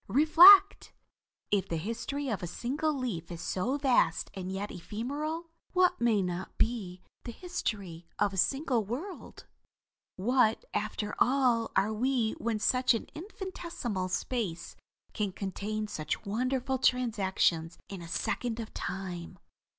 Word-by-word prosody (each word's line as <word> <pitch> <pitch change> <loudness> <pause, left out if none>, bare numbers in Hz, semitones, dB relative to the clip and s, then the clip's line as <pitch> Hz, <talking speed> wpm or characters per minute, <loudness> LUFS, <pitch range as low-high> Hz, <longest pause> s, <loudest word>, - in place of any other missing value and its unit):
Reflect! 355 +8 +7 0.6
If 200 -3 +1
the 165 - -1
history 230 - -4
of 220 -6 -2
a 175 - -4
single 270 - -1
leaf 235 - -4
is 170 - -6
so 210 +10 -1
vast 260 - +2
and 185 -1 -5
yet 200 +2 -4
ephemeral, 290 - -4 0.2
what 365 -7 +3
may 220 -4 +3
not 180 +1 -5
be 195 -6 -1 0.2
the 235 - -6
history 200 - -5
of 205 -1 +1
a - - -5
single 265 - +1
world? 280 - -7 0.7
What, 225 +2 +2
after 210 0 -2
all, 245 -3 +3
are 200 +3 +2
we 240 0 +1
when 225 -1 -1
such 250 +3 +3
an 225 - -5
infinitesimal 335 - -5
space 180 -2 -3 0.4
can 205 -3 -2
contain 210 +3 -4
such 155 +2 -4
wonderful 255 +5 -1
transactions 190 -10 +1
in 195 -3 -7
a 170 - -8
second 230 +6 -2
of 225 -1 -7
time." 185 -1 -5
225 Hz, 135 wpm, -30 LUFS, 190-265 Hz, 0.7 s, Reflect